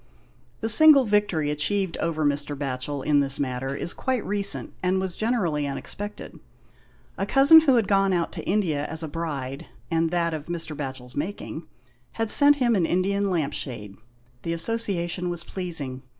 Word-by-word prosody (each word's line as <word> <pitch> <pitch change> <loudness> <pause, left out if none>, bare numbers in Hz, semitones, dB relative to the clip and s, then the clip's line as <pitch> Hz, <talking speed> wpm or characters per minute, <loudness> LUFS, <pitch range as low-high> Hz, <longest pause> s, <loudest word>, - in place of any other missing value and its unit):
The 225 - -1
single 275 +3 +7
victory 205 -8 +1
achieved 185 +5 -1
over 160 -2 -1
Mr. 145 0 -1
Batchel 135 0 -3
in 145 -1 +3
this 135 -1 +1
matter 135 0 -3
is 170 - -4
quite 260 -4 -2
recent, 200 0 0
and 185 +1 +1
was 190 -2 -3
generally 180 -11 -1
unexpected. 205 +9 -6 0.8
A - - -1
cousin 280 +4 +8
who 275 -5 +3
had 225 -5 +2
gone 195 -1 +2
out 175 -2 0
to - - -8
India 170 -8 0
as 160 +2 -2
a - - -3
bride, 145 -4 -5 0.2
and 165 0 +1
that 170 -1 0
of 155 -1 -6
Mr. 165 -3 -4
Batchel's 130 -3 -7
making, 175 +8 -5 0.5
had 225 -1 -2
sent 290 0 +6
him 245 -5 +1
an 175 -5 +1
Indian 200 +2 0
lamp 155 -6 -1
shade. 105 -9 -5 0.5
The 165 - -3
association 180 -2 -1
was 175 -1 -4
pleasing. 160 -10 -4
170 Hz, 165 wpm, -24 LUFS, 145-205 Hz, 0.8 s, cousin